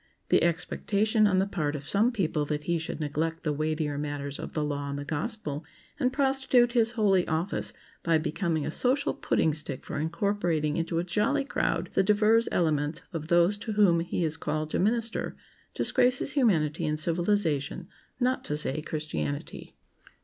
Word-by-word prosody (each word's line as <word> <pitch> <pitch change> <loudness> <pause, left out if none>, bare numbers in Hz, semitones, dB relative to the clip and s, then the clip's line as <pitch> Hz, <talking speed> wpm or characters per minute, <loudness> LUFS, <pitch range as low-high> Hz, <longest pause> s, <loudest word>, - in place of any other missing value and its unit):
The - - +4
expectation 205 +5 +1
on 190 -2 +2
the 190 - +3
part 155 -7 -2
of 145 0 -7
some 220 +5 +3
people 165 -9 0
that 150 0 -2
he 170 +1 0
should 160 - -5
neglect 160 +2 -2
the 150 -3 0
weightier 155 -1 -1
matters 145 -1 -4
of - - -7
the 155 - -1
law 145 -1 -3
and 140 - -3
the 145 - -5
gospel, 155 - -3 0.4
and 255 -3 +2
prostitute 265 -3 +3
his 235 -1 +2
holy 200 -5 +3
office 165 +5 -1 0.3
by 165 -1 +3
becoming 160 -1 -1
a - - -2
social 260 - +1
pudding 160 - +1
stick 145 -3 -5
for - - -4
incorporating 165 -2 0
into 165 0 -1
"a 170 - +1
jolly 215 +11 +1
crowd" - - -1
the - - +4
divers 215 +3 +3
elements 155 -2 0
of 155 -2 -4
those 175 +4 +3
to 215 +1 -4
whom 195 -5 +4
he 170 +1 -2
is 160 -1 -1
called 155 -1 -2
to - - 0
minister, 230 +3 0 0.4
disgraces 250 +3 +2
humanity 165 - +2
and 155 0 0
civilization—not 175 - -1
to 150 - -2
say 150 0 -2
Christianity. 80 - -4
170 Hz, 170 wpm, -28 LUFS, 150-210 Hz, 0.4 s, The